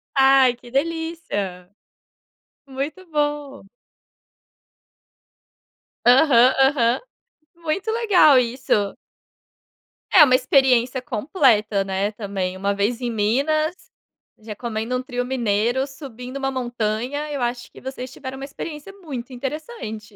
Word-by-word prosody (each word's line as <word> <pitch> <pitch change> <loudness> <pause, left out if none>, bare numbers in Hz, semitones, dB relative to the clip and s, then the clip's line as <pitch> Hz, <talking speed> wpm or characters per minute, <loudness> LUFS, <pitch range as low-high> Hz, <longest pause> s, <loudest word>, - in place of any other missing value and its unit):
Ai 270 -2 +5
que 240 0 -16
delícia. 275 - -3 1.0
Muito 285 +7 -5
bom. 295 -2 -2 2.4
Aham, 255 -1 +6
aham 260 -3 +3 0.6
muito 340 +6 -2
legal 365 - +5
isso. 235 -4 0 1.2
É 320 - +9
uma 255 -3 +5
experiência 255 -1 +3
completa, 220 - +1
né, 195 +1 -1
também. 195 -3 -4
Uma 200 +1 0
vez 225 +5 -1
em 245 - -1
Minas, 280 - +1 0.6
já 215 -1 -8
comendo 230 +1 -3
um 250 - -3
trio 245 -1 -3
mineiro, 240 +1 0
subindo 265 -2 -9
uma 270 0 -2
montanha, 245 +4 -3
eu 280 -3 -3
acho 240 0 -3
que - - -14
vocês 260 -1 -7
tiveram 260 0 -8
uma 270 - -6
experiência 300 +4 -8
muito 265 -6 -7
interessante. 250 - -6
255 Hz, 110 wpm, -22 LUFS, 225-285 Hz, 2.4 s, É